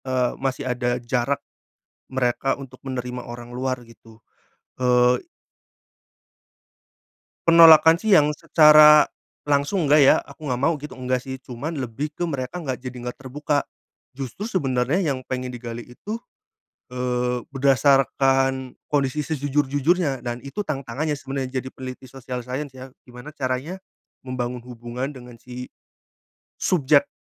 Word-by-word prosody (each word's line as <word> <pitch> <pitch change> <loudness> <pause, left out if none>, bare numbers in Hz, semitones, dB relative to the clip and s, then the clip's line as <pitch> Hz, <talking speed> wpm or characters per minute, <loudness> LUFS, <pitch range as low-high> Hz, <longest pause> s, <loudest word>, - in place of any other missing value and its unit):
Eee, 130 -2 0
masih 135 +1 -2
ada 125 -1 -1
jarak, 125 +3 -1 0.7
mereka 130 0 0
untuk 130 -2 -11
menerima 125 -1 -4
orang 120 0 -9
luar 130 0 -3
gitu. 115 -1 -18 0.6
Eee 125 0 +3 2.2
penolakan 165 -1 +8
sih 215 +3 +1
yang 150 -5 +6
secara 150 -1 +8 0.5
langsung 145 +3 +1
nggak 150 +1 +6
ya, - - +7
"aku 155 - -13
nggak 125 -3 -2
mau" 160 +2 +2
gitu, 150 +1 -9
enggak 130 -1 -2
sih 130 0 -6
cuman 130 +5 -6
lebih 140 +2 -4
ke - - -12
mereka 140 +4 -4
nggak 130 -5 -3
jadi 125 0 -8
nggak 125 0 -6
terbuka. 145 +2 -2 0.5
Justru 135 - -6
sebenarnya 145 - 0
yang 130 - -5
pengen 130 -1 -4
digali 120 -1 -7
itu, 210 - -7 0.7
eee, 125 0 -1
berdasarkan 135 -1 +2 0.2
kondisi 145 0 +1
sejujur-jujurnya. 145 +1 0
Dan 120 0 -5
itu 140 +9 -7
tantangannya 140 +1 -2
sebenarnya 135 -1 -4
jadi 130 - -7
peneliti 130 -1 -9
sosial 125 -2 -6
science 130 +2 -5
ya. 130 0 -10 0.2
Gimana 125 +4 -10
caranya 135 +6 -3 0.5
membangun 125 -1 -3
hubungan 120 +1 -5
dengan 125 -2 -12
si 125 +1 -9 0.9
subjek, 145 -5 +3
130 Hz, 130 wpm, -23 LUFS, 125-145 Hz, 2.2 s, penolakan